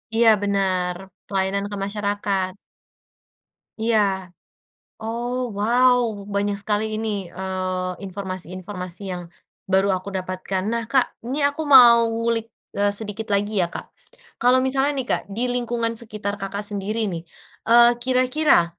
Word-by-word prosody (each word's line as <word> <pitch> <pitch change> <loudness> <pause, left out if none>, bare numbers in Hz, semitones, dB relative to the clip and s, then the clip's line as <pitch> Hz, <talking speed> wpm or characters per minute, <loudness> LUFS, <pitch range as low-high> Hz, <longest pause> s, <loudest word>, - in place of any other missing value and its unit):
Iya, 230 0 +6
benar, 190 -3 0 0.3
pelayanan 195 0 -1
ke - - -3
masyarakat. 200 -2 -1 1.3
Iya. 200 -5 +1 0.7
Oh, 240 +2 -3
wow. 245 +5 +3 0.4
Banyak 200 0 0
sekali 215 +1 -1
ini, 215 -3 -2
eee, 185 0 -3
informasi-informasi 185 -1 -5
yang, 180 0 -5 0.4
baru 195 +1 +3
aku 195 +2 -9
dapatkan. 185 0 -3
Nah, 230 -1 -2
Kak, 255 +2 +1
ini 275 +4 -1
aku 285 +2 0
mau 240 -4 +8
ngulik, 230 0 -1 0.3
eee, 205 0 +2
sedikit 215 +1 -3
lagi, 205 +1 0
ya, 180 - +3
Kak. - - -8 0.5
Kalau 250 +1 +4
misalnya, 270 +2 +1
nih, 265 -3 -3
Kak, - - +1
di 230 +6 -2
lingkungan 235 -2 -1
sekitar 210 -3 -4
Kakak 200 +1 -4
sendiri, 205 +1 -2
nih, 170 -1 -6 0.4
eee, 235 +1 +7
kira-kira, 255 - +2
205 Hz, 130 wpm, -23 LUFS, 190-235 Hz, 1.3 s, mau